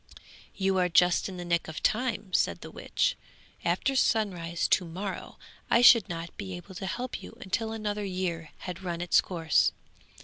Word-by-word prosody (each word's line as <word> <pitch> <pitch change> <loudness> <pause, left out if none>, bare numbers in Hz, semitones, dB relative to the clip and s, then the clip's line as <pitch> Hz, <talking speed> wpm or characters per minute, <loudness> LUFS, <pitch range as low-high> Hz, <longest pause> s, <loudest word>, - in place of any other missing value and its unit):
'You 190 -1 +1
are 180 -1 +2
just 180 +2 +4
in 185 - -7
the 175 - -6
nick 170 -1 0
of 160 -1 -7
time,' 215 -5 0
said - - +1
the - - -9
witch; - - 0 0.5
'after 270 - +1
sunrise 180 -9 +1
to 185 - +4
morrow 185 +3 -6 0.3
I 235 - +4
should 230 -4 +8
not 165 0 -6
be 190 -3 -5
able 175 +2 -11
to 190 +1 -5
help 245 +5 -4
you - - -11
until 220 +4 -2
another 210 -2 -3
year 180 -4 -3 0.2
had 180 -1 -5
run 175 -2 -3
its 175 - +4
course. 165 -4 +2
185 Hz, 175 wpm, -28 LUFS, 175-210 Hz, 0.5 s, should